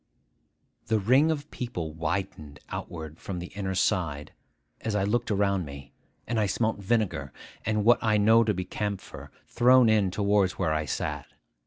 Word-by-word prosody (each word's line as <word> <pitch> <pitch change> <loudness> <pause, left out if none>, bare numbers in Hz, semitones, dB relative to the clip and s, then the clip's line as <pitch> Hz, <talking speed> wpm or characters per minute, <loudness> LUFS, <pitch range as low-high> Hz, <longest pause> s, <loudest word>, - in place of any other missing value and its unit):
The 110 - +2
ring 130 +10 +4
of 150 -2 -3
people 115 -11 -5
widened 80 -3 -4
outward 80 -1 -7
from 95 - -5
the 90 0 -7
inner 95 -2 -3
side 85 -7 -1 0.5
as 110 -2 -3
I 100 - +1
looked 115 +4 0
around 100 -2 +1
me; 70 -2 -10 0.3
and 115 -1 -1
I 105 - +2
smelt 110 +2 0
vinegar, 100 - -1 0.4
and 105 -1 +1
what 120 +1 +6
I 110 -1 +3
know 110 +3 +5
to 105 -1 +1
be 90 0 -3
camphor, 100 +1 -5 0.2
thrown 125 -1 +5
in 105 -3 +3
towards 100 0 +2
where 80 - -1
I 75 0 -1
sat. 65 - -3
100 Hz, 165 wpm, -27 LUFS, 85-110 Hz, 0.5 s, what